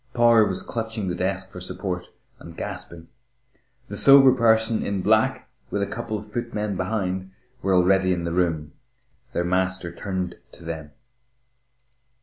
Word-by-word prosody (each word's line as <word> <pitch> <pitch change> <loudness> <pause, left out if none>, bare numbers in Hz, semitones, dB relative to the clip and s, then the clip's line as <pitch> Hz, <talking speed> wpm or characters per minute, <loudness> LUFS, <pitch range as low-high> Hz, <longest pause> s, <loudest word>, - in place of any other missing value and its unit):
Power 115 -3 +5
was 95 - -2
clutching 110 -4 -4
the 90 - -2
desk 95 +1 -2
for 90 - -9
support, 90 0 -4 0.3
and 85 0 -12
gasping. 85 0 -7 0.8
The - - -6
sober 135 -1 +8
person 110 -2 +3
in 100 -2 -2
black, - - +2 0.2
with 100 - -1
a - - +1
couple 110 0 -4
of 105 - -8
footmen 105 -3 -3
behind, 95 -1 -2 0.3
were 95 -3 +2
already 95 +1 +4
in 90 -1 -1
the 85 - -2
room.... 80 -4 0 0.6
Their 85 - 0
master 95 -1 0
turned 95 -1 -4
to - - -14
them. 80 -3 -6
95 Hz, 145 wpm, -24 LUFS, 90-110 Hz, 0.8 s, sober